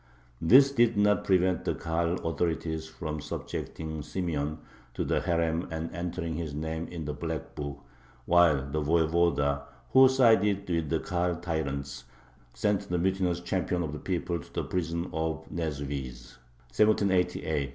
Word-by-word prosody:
This 135 +11 +7
did 120 -4 +3
not 105 0 +3
prevent 90 -2 +2
the - - -1
Kahal 85 +1 -1
authorities 80 -1 -1
from 80 -1 -5
subjecting 80 +1 -5
Simeon 75 -2 -2 0.4
to - - -1
the - - +1
herem 85 0 0
and 80 0 -4
entering 85 -1 -3
his 80 -3 -4
name 80 +2 -3
in 85 -3 -6
the 75 - -3
"black - - -5
book," 70 -1 -6 0.4
while 85 -6 +4
the 75 +3 -2
Voyevoda, 80 -2 +2 0.3
who 130 0 +8
sided 110 -6 +4
with 85 -4 -1
the 80 - +1
Kahal 90 +1 -1
tyrants, 70 -6 -3 0.5
sent 105 -2 0
the 90 - 0
mutinous 90 -1 0
champion 90 -1 -1
of 75 -2 -4
the 75 - -5
people 85 -2 -2
to - - -13
the - - -1
prison 85 -1 -2
of 80 0 -2
Neswizh 70 -6 -4 0.4
(1788). 90 -8 +2
85 Hz, 145 wpm, -29 LUFS, 75-90 Hz, 0.5 s, who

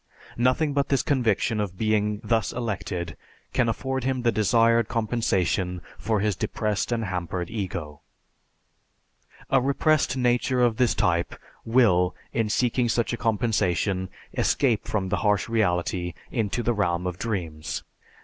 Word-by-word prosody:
Nothing 130 +5 +2
but 140 -1 0
this 135 -2 +2
conviction 115 -4 +1
of 95 -3 -3
being 105 -1 +1
thus 110 0 +1
elected 90 -7 -3 0.4
can 125 -3 +2
afford 130 +2 -2
him 130 -1 -1
the 120 - +3
desired 115 +1 +3
compensation 100 -5 0 0.2
for 110 -1 0
his 105 -2 +1
depressed 105 +4 -2
and 115 -2 0
hampered 90 -1 -3
ego. 90 -9 -5 1.5
A 135 - +5
repressed 140 +1 +2
nature 125 +1 +1
of 115 -2 +2
this 125 -2 +2
type 85 -1 +1 0.3
will, 105 -7 +3 0.2
in 115 -2 0
seeking 120 +2 +1
such 120 +1 0
a - - -2
compensation, 100 -5 0 0.3
escape 120 -7 +1
from 95 -3 -1
the - - +1
harsh 105 -2 +1
reality 90 -5 0 0.2
into 115 0 -1
the 120 +2 +1
realm 90 -4 0
of 90 0 -3
dreams. 85 -9 -3
110 Hz, 140 wpm, -25 LUFS, 95-120 Hz, 1.5 s, A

